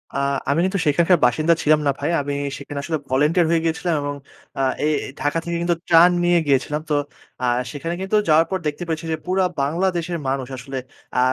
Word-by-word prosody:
আ - - 0 0.3
আমি 145 +3 +2
কিন্তু 190 +1 -1
সেখানকার 170 +5 +4
বাসিন্দা 155 +7 +3
ছিলাম 155 0 +4
না - - +4
ভাই। 145 - -1
আমি 145 0 -3 0.2
সেখানে 140 0 -6
আসলে 160 +1 -1
ভলান্টিয়ার 150 +6 +3
হয়ে 165 -1 +3
গিয়েছিলাম 165 +1 0
এবং 145 0 -3 0.4
আ - - +1 0.2
এ - - +3 0.3
ঢাকা 145 +4 0
থেকে 170 0 -3
কিন্তু 170 0 +1
ত্রাণ 170 +1 +7
নিয়ে 175 0 +4
গিয়েছিলাম। 145 +2 +1
তো - - +1 0.5
আ - - +2 0.3
সেখানে 165 +4 -4
কিন্তু 190 +2 -1
যাওয়ার 160 +1 +5
পর 190 - +1
দেখতে 150 +4 -3
পেয়েছি 160 0 -3
যে, 160 - 0
পুরা 185 +1 +1 0.2
বাংলাদেশের 170 +3 -1
মানুষ 130 -1 -1
আসলে 135 +2 -6 0.4
আ - - +4
160 Hz, 195 wpm, -21 LUFS, 145-175 Hz, 0.5 s, ত্রাণ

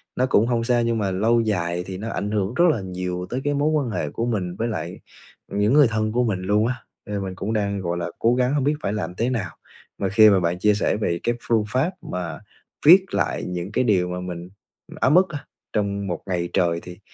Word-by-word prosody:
nó 130 - +2
cũng 110 -2 +3
hông 120 -2 +1
sao 120 0 +2
nhưng 115 -1 0
mà 100 -3 0
lâu 115 +5 +2
dài 90 -5 -1
thì 95 - -5
nó 110 +4 -5
ảnh 105 -1 -3
hưởng 100 0 -1
rất 170 +7 +4
là 115 -9 -2
nhiều 90 -1 -4
tới 130 +2 -3
cái 145 - 0
mối 145 +2 +1
quan 150 -5 0
hệ - - -2
của 115 - -2
mình 95 -7 -2
với 115 +3 -2
lại 85 -4 -4 0.5
những 105 +5 +1
người 145 -4 +7
thân 110 0 -1
của 125 +2 +1
mình 100 -5 -1
luôn 105 +4 +2
á, 125 - -1 0.3
nên 100 -1 -3
mình 95 -1 -5
cũng 105 +4 -3
đang, 100 -2 -1
gọi 85 -1 -2
là, 85 0 -2
cố 120 +2 +3
gắng 125 +1 +1
hông 145 -2 +1
biết 145 +3 +2
phải 100 - -1
làm 90 -4 -4
thế 115 +6 0
nào. 100 -9 -3 0.4
Mà 95 - 0
khi 110 +2 +7
mà 100 - +4
bạn 90 0 -1
chia 105 +2 +4
sẻ 105 - 0
về 85 -5 -1
cái 120 0 +1
phương 115 -2 +1
pháp 135 - +1
mà 90 -2 -5 0.5
viết 185 +4 +8
lại - - -1
những 90 +1 -4
cái 120 - +1
điều 95 -7 +2
mà 90 0 -4
mình 90 -1 -6 0.5
ấm 135 +5 +3
ức 190 - +6
á, 145 -4 -7 0.3
trong 100 -2 -1
một 85 -3 -3
ngày 85 -2 -1
trời 85 -3 +2
thì 90 +2 -10
105 Hz, 250 wpm, -23 LUFS, 90-120 Hz, 0.5 s, viết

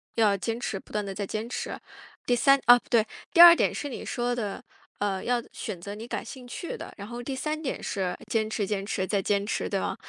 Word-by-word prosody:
要 210 -3 +4
坚 225 +4 -3
持， 200 -5 -3
不 - - -18
断 210 -1 -2
地 195 - -5
在 200 0 -4
坚 220 +3 -3
持。 240 - -4 0.5
第 245 - +3
三， 275 +3 +5
哦， 245 0 +9
不 - - -26
对， 230 -3 +4 0.3
第 - - 0
二 345 0 +12
点 - - +2
是 290 - -4
你 265 - -6
说 245 0 -1
的， 210 -4 -4 0.4
呃， 195 -2 -1
要 245 -1 +1
选 210 -7 -5
择 200 +4 -7
你 220 +2 -8
感 - - -4
兴 255 +1 -9
趣 290 +8 -6
的， - - -8
然 200 -1 -8
后 240 +1 -6
第 265 +1 -4
三 305 +3 -3
点 275 - -3
是， 185 -2 -2
坚 220 -1 0
持 210 -1 -1
坚 200 -1 -2
持 190 -2 -1
再 200 -1 +1
坚 200 +1 0
持， 210 - -2
对 - - 0
吗？ - - -2
225 Hz, 270 characters per minute, -27 LUFS, 200-245 Hz, 0.5 s, 二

